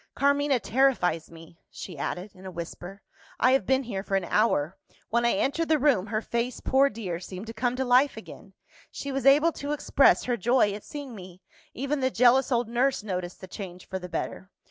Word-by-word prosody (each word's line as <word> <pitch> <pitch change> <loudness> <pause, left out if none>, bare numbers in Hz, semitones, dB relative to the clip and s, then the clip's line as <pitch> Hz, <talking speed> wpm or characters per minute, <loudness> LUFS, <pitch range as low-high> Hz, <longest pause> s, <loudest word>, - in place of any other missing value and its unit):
"Carmina 285 -1 +2
terrifies 220 -10 +1
me," 165 0 -15
she 180 - -9
added 180 +7 -4
in 185 - -16
a 190 - -6
whisper. 175 +3 -8 0.4
"I 255 - +4
have 270 - +2
been 265 0 +2
here 210 -6 -4
for 195 0 -2
an 190 -2 0
hour. 180 -6 +1 0.3
When 235 +1 +2
I - - +3
entered 285 +11 0
the 315 - +4
room 260 -9 +2
her 215 +1 -2
face, 235 +1 -2
poor 275 +1 +3
dear, 195 -7 -5
seemed 185 +2 -8
to 225 - -8
come 245 +2 -1
to 265 +1 -1
life 255 +3 +3
again; - - -11 0.4
she 280 - -6
was 270 0 -1
able 300 +5 +6
to 290 -1 -4
express 285 -1 +3
her 245 -1 -1
joy 225 0 +2
at 205 - -8
seeing 285 -4 -8
me. 185 -3 -12 0.3
Even 275 +3 -2
the 260 -1 +1
jealous 250 +2 +4
old 240 -2 +1
nurse 245 +1 0
noticed 180 -3 -5
the 185 - -8
change 185 -2 -8
for 190 - -4
the 180 0 -8
better. 185 - -5
235 Hz, 210 wpm, -27 LUFS, 185-270 Hz, 0.4 s, able